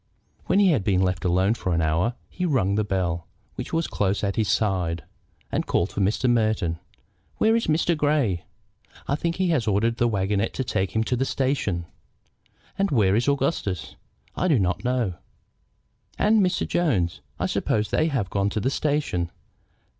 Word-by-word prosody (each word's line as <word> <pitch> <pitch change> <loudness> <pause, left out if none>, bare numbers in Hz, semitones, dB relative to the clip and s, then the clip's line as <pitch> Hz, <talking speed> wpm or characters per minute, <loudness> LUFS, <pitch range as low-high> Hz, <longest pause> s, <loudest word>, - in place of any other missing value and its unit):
When - - +3
he 200 -3 +5
had 135 -11 +1
been 95 -2 +2
left 90 -1 -1
alone 95 +4 +3
for 90 -6 -2
an 80 - +1
hour 85 +10 +1
he 180 - -6
rung 130 - +2
the 105 +1 +1
bell, 90 -4 -2 0.3
which - - -6
was 165 0 0
close 100 0 -1
at 100 -1 0
his 110 -2 +1
side, 90 -7 0 0.5
and - - -1
called 85 - +1
for 100 - -2
Mr. 105 +6 +1
Merton. 110 -8 +1 0.6
"Where 220 +1 +3
is 230 - 0
Mr. 160 +2 +2
Grey?" 145 - +1 0.6
"I - - 0
think 170 +3 -1
he 185 -1 0
has 145 -9 +1
ordered 110 +3 +1
the 120 - +2
wagonette 100 0 0
to 130 - -1
take 95 -5 -2
him 110 - +3
to 125 - 0
the 125 - 0
station." 130 -11 -1 0.9
"And 195 0 +2
where 105 - +3
is 120 +4 +1
Augustus?" 135 - -1 0.4
"I 185 - 0
do 155 -7 +4
not 90 -1 0
know." 120 -8 0 1.0
"And 215 +1 +4
Mr. 180 -2 +1
Jones? 110 - 0 0.2
I - - 0
suppose 105 0 0
they 155 - +2
have 135 -10 0
not - - -21
gone 100 0 +1
to 110 - -2
the 130 +5 0
station. 140 - 0
110 Hz, 185 wpm, -24 LUFS, 95-140 Hz, 1.0 s, he